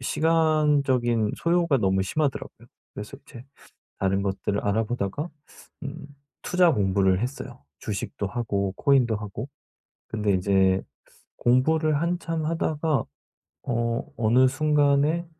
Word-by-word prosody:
시간적인 145 -7 +2
소요가 170 -4 +2
너무 95 -2 +1
심하더라고요. 140 +8 -3 0.3
그래서 - - -8
이제 120 - -12 0.6
다른 95 0 +1
것들을 100 +1 -2
알아보다가 110 - -2 0.5
음 140 0 -7 0.4
투자 180 -2 +3
공부를 95 -2 +2
했어요 125 - -6 0.2
주식도 100 -1 -4
하고 100 -4 -2
코인도 130 -6 +3
하고. 105 +5 -6 0.6
근데 105 -2 0
인제 95 0 +2 0.5
공부를 150 +5 +2
한참 170 -2 -2
하다가 160 -2 0 0.6
어 115 -1 -1
어느 120 +3 +4
순간에 150 +3 +2
125 Hz, 260 characters per minute, -25 LUFS, 100-155 Hz, 0.6 s, 어느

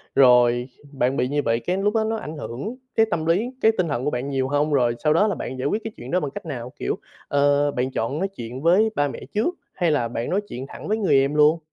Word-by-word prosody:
Rồi 125 -1 +5 0.2
bạn 135 0 0
bị 125 - +1
như 145 +1 0
vậy 115 -2 +1
cái 180 +8 -2
lúc 205 +3 0
đó 220 - +3
nó 220 +1 -1
ảnh 155 -7 -7
hưởng 145 - -5 0.2
cái 225 - +5
tâm 160 -1 -1
lý, 195 +9 +2
cái 220 - +6
tinh 180 -3 +1
thần 125 -3 -2
của - - +2
bạn 125 +3 -3
nhiều 135 -1 0
hông? 145 +2 +1
Rồi 120 -3 +2
sau 150 0 +4
đó 205 +6 +4
là 200 - 0
bạn 130 - -5
giải 135 - 0
quyết 215 +7 -1
cái 225 - -5
chuyện 120 - -8
đó 180 - +3
bằng 145 -4 -3
cách 200 0 -8
nào? 125 -5 -6
Kiểu, - - -1 0.3
ờ, 145 0 +3
bạn 130 +1 -2
chọn 130 +6 -2
nói 195 - 0
chuyện 125 -8 -8
với 185 +8 +4
ba 145 0 +2
mẹ 135 - -6
trước, 235 +13 0 0.2
hay 170 -4 +1
là 120 -6 +1
bạn 115 0 -4
nói 200 +3 +1
chuyện 130 -5 -6
thẳng - - -9
với 215 +1 +1
người 195 -9 +2
em 140 +2 +1
luôn? 150 +2 +5
145 Hz, 275 wpm, -23 LUFS, 130-185 Hz, 0.3 s, cái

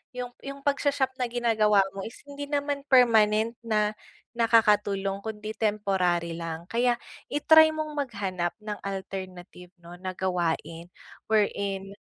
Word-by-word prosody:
yung 245 -1 -5
yung 275 0 -8
pagsha-shop 280 -1 +1
na 250 - +1
ginagawa 220 -4 +3
mo 195 - -7
is 225 - -10
hindi 285 0 -7
naman 285 -1 -1
permanent 225 -3 +4
na 215 -2 +1 0.4
nakakatulong 205 -4 +2
kundi 215 0 -6
temporary 190 -6 0
lang 165 0 -6
kaya 240 0 +1 0.3
i-try 315 +2 +6
mong 310 -1 -4
maghanap 200 - -2
ng 210 -1 -5
alternative 185 -2 -7
'no 175 0 -13
na 185 0 -5
gawain, 170 -2 -2 0.4
where 215 -2 +4
in 195 -1 -4
210 Hz, 130 wpm, -27 LUFS, 190-245 Hz, 0.4 s, i-try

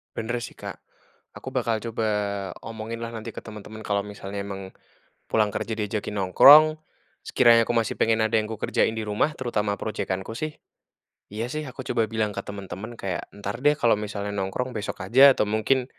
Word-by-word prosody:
Benar 120 +1 -3
sih, - - -7
Kak. - - -6 0.6
Aku - - -9
bakal 115 -2 +1
coba 115 0 -2 0.5
omongin 115 +1 -6
lah, 115 0 -5
nanti 110 - -6
ke - - -7
teman-teman, 110 0 -10
kalau 100 -1 +1
misalnya 100 -1 -6
emang, 95 -1 -7 0.6
pulang 110 -1 +3
kerja 115 - -4
diajakin 105 -1 -3
nongkrong, 145 - +8 0.5
sekiranya 115 -2 +5
aku - - +1
masih 115 -2 +1
pengen, 115 0 +2
ada 110 +1 +1
yang 110 0 +1
aku 110 - -6
kerjain - - +1
di 110 - -3
rumah, 105 +9 +1
terutama 105 -5 -1
projekan 95 -3 -3
ku, 110 - -6
sih. 155 +4 -5 0.7
Iya 110 +3 -3
sih, 155 0 -3
aku 130 0 -9
coba 110 -2 0
bilang 110 -2 -1
ke - - -3
teman-teman 100 +3 -8
kayak, 95 -2 -4
"Entar 100 +4 -5
deh," 145 +1 +4
kalau 120 -5 +4
misalnya 100 -1 -4
nongkrong, 100 +6 -3
"besok 105 -2 -4
aja, 135 +7 +7
atau - - +2
mungkin" 110 +5 +1
110 Hz, 185 wpm, -25 LUFS, 100-115 Hz, 0.7 s, nongkrong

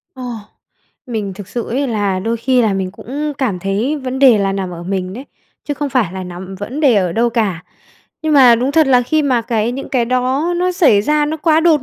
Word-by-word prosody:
Ồ. 255 - -8 0.8
Mình 215 -5 -3
thực 205 0 -10
sự 235 +1 -4
ấy 270 +4 -1
là 205 -4 -1
đôi 225 +4 -2
khi 250 +1 +2
là 215 -3 +2
mình 190 -1 -2
cũng 290 +9 -5
cảm 225 -10 -1
thấy 205 - -1
vấn 260 -1 -4
đề 255 -5 +6
là 195 -1 0
nằm 190 -2 -3
ở 170 0 -8
mình 185 0 -3
đấy, 255 +6 -8 0.4
chứ 290 - -3
không 290 +1 -3
phải 240 -10 0
là 190 -1 -5
nằm 180 +2 -8
vấn 225 +10 -6
đề 270 -6 +4
ở 180 -3 +1
đâu 235 +3 +1
cả. 200 -8 -1 0.6
Nhưng 310 -1 0
mà 255 -4 +7
đúng 255 +4 -1
thật 315 -3 +4
là 250 -2 +4
khi 310 +5 +1
mà 250 -5 +1
cái 225 +1 -1
những 275 - -6
cái 250 -3 +1
đó 255 +7 0
nó 365 +1 0
xảy 290 - +4
ra 300 +5 +2
nó 315 +2 -2
quá 315 0 +2
đột 320 -5 +3
240 Hz, 240 wpm, -16 LUFS, 200-280 Hz, 0.8 s, mà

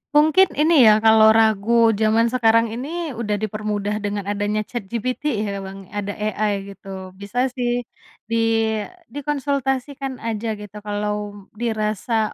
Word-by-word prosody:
Mungkin 315 +5 +4
ini 315 +3 +3 0.2
ya, 210 - +6
kalau 220 0 +7
ragu 225 +1 +4
zaman 225 +2 +3
sekarang 230 -2 +4
ini, 305 +5 -4
udah 210 -3 -2
dipermudah 210 0 -3
dengan 205 -1 -3
adanya 205 +1 -1
ChatGPT, 240 +6 -3 0.2
ya, 200 -1 -4
Bang. 195 0 -9
Ada 205 -1 -3
AI 210 0 -1 0.2
gitu, 190 -1 -9
bisa 200 +6 -2
sih 245 -1 -1 0.4
di 230 +1 -1 0.8
dikonsultasikan 275 -2 -2
aja, 225 -1 -4
gitu, 210 0 -10
kalau 205 -1 -4
dirasa 220 0 -1
220 Hz, 125 wpm, -21 LUFS, 205-245 Hz, 0.8 s, kalau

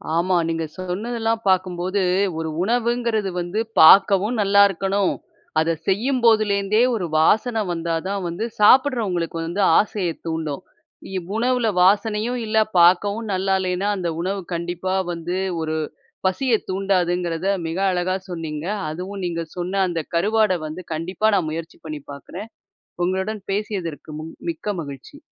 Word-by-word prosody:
ஆமா. 180 +2 +2
நீங்க 165 0 -1
சொன்னதெல்லாம் 225 +5 -2
பார்க்கும்போது, 185 +1 0 0.4
ஒரு 160 -1 -3
உணவுங்கிறது 235 -2 0
வந்து 175 +5 -3 0.2
பார்க்கவும் 200 +6 +6
நல்லாயிருக்கணும். 200 -1 +3 0.5
அத 160 +1 +1 0.2
செய்யும்போதுலேருந்தே 215 -2 +2
ஒரு 185 -5 -2
வாசன 220 +6 +3
வந்தாதான் 170 +4 -2
வந்து 170 +7 -3
சாப்பிடுறவங்களுக்கு 210 -9 +3
வந்து 180 +5 -2 0.2
ஆசைய 200 -4 -1 0.2
தூண்டும். 160 0 -3 0.5
இவ் 180 0 -4
உணவுல 245 -1 +1 0.2
வாசனையும் 215 +5 +2
இல்ல, 220 0 -1 0.2
பார்க்கவும் 200 +6 +4
நல்லா 190 +1 0
இல்லேன்னா, 185 +2 -1
அந்த 175 -2 -2
உணவு 195 +2 -2
கண்டிப்பா 175 +2 -3 0.2
வந்து 175 +2 -3 0.2
ஒரு 160 0 -2 0.5
பசியத் 225 +4 +1
தூண்டாதுங்கிறத 180 -2 0 0.2
மிக 165 - -4
அழகா 180 +1 0
சொன்னீங்க. 160 -3 -5 0.2
அதுவும் 185 +5 -6
நீங்க 170 -1 -2
சொன்ன 180 +2 -2
அந்த 170 -2 -2 0.2
கருவாட 210 +2 +3
வந்து 155 +4 -6
கண்டிப்பா 180 +6 -1
நான் 170 -5 +1
முயற்சி 165 +1 -6
பண்ணி 155 -2 -6
பார்க்குறேன். 185 +9 -9 0.6
உங்களுடன் 190 +3 -2
பேசியதற்கு 195 -7 -3
முன் 160 +1 -8 0.2
மிக்க 195 +5 -4
மகிழ்ச்சி. 140 - -10
190 Hz, 125 wpm, -22 LUFS, 170-210 Hz, 0.6 s, பார்க்கவும்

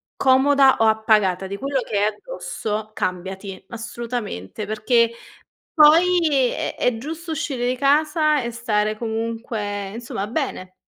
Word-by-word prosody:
comoda 270 +1 +4
o 225 - +4
appagata 215 -4 +2
di 200 +1 -5
quello 275 +2 -1
che 215 - -3
hai 205 - +3
addosso, 215 - -5
cambiati, 190 +1 -4
assolutamente. 225 - -5
Perché 230 +2 +2 0.6
poi 315 -4 +5
è - - -3
è 250 -2 +1
giusto 320 +7 -6
uscire 265 -5 -2
di 255 - 0
casa 300 +2 +2
e 235 - -3
stare 215 -2 -1
comunque, 220 -3 -4
insomma, 225 -3 -5
bene. 215 -7 -4
235 Hz, 125 wpm, -22 LUFS, 210-275 Hz, 0.6 s, poi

